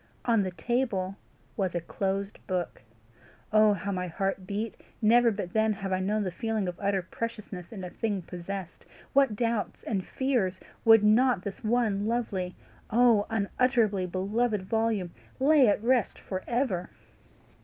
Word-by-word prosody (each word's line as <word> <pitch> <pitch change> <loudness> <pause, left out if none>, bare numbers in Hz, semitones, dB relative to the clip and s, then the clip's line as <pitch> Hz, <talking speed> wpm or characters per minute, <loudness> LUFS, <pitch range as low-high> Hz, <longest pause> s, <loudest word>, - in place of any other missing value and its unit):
On 230 -3 +3
the 190 - -1
table 195 -2 -1 0.4
was 190 -4 -1
a - - +2
closed 195 +4 -3
book. 180 -3 -2 0.7
Oh 215 -1 +6
how 200 +1 -3
my 180 -1 -2
heart 195 +2 -2
beat! 210 +3 -3 0.2
Never 235 +2 +5
but 195 -5 -4
then 220 0 +3
have 195 -2 -4
I 185 - +1
known 210 +3 0
the 185 - -2
feeling 220 0 -2
of 180 - -2
utter 195 -2 0
preciousness 210 -3 -6
in 200 -5 -7
a 180 - -6
thing 205 -5 -2
possessed. 180 +1 -7 0.3
What 275 -6 +4
doubts 230 -1 -1
and 195 -4 -1
fears 220 -7 -1 0.3
would 225 -2 +8
not 220 -1 +4
this 200 - -6
one 215 -3 +1
lovely, 200 -6 -2 0.3
oh 230 -2 +4
unutterably 220 -2 +1
beloved 205 +3 0
volume, 220 -3 0 0.3
lay 280 -1 +5
at 205 +1 +2
rest 245 -1 +2
for 185 -1 -5
ever! 235 -8 -1
205 Hz, 155 wpm, -28 LUFS, 190-230 Hz, 0.7 s, would